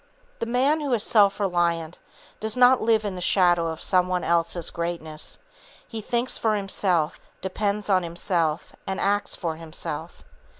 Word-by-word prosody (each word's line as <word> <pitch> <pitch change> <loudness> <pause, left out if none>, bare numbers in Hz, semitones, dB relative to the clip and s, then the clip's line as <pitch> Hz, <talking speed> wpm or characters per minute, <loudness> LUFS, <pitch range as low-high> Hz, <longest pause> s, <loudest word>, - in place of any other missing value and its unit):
The 230 - -2
man 270 +6 +2
who 285 -2 -2
is 220 -3 +1
self 200 -3 +4
reliant 170 -3 0 0.4
does 220 +2 -2
not 250 +1 +6
live 220 -1 +2
in 200 - -2
the 180 - -6
shadow 175 -2 +3
of 160 0 -1
some 180 -1 +3
one 180 -1 -1
else's 170 0 +1
greatness; 170 -2 -4 0.5
he 225 - -6
thinks 240 +3 -1
for 220 -2 +2
himself, 185 -5 0 0.2
depends 200 +2 -2
on 190 -2 +3
himself, 170 -2 -1
and 190 0 -2
acts 205 +1 0
for 165 -3 -3
himself. 160 -1 -7
185 Hz, 160 wpm, -25 LUFS, 170-215 Hz, 0.5 s, not